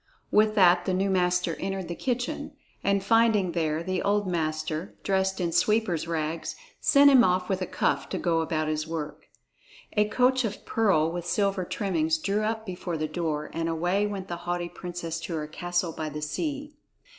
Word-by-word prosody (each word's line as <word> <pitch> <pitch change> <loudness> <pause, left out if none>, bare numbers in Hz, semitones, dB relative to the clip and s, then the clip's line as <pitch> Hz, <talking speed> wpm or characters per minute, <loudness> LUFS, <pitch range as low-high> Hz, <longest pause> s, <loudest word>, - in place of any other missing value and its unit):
With 215 0 +4
that 180 -3 +5
the 185 - +1
new 195 +1 +1
master 180 -2 +1
entered 195 -1 -3
the 170 - -3
kitchen, 265 - -3 0.3
and 200 -1 +2
finding 225 -4 +3
there 160 -1 -1
the 185 +1 -1
old 205 0 +1
master 155 0 -2
dressed 190 0 0
in 175 -2 0
sweeper's 200 -4 +1
rags, 160 0 -2 0.2
sent 285 0 +6
him 260 -3 +7
off 180 -2 +1
with 190 -1 0
a 185 - -1
cuff 140 -1 0
to - - -2
go 165 -2 +1
about 155 -1 -1
his 155 0 -2
work. 160 -2 -5 0.7
A 210 -1 +3
coach 255 +4 +2
of 210 -3 -4
pearl 190 -8 +2
with 175 0 -5
silver 195 +1 +1
trimmings 160 -5 0
drew 200 +6 -1
up 220 +1 -2
before 180 -3 -4
the 155 0 -1
door, 155 -2 -3
and 165 0 -1
away 175 +5 +1
went 195 -2 -5
the 175 - -4
haughty 175 0 -1
princess 170 -2 -5
to 165 +1 -5
her 155 -1 -2
castle 175 +2 -2
by 155 -1 -4
the 150 0 -6
sea. 290 - -3
180 Hz, 185 wpm, -27 LUFS, 165-205 Hz, 0.7 s, him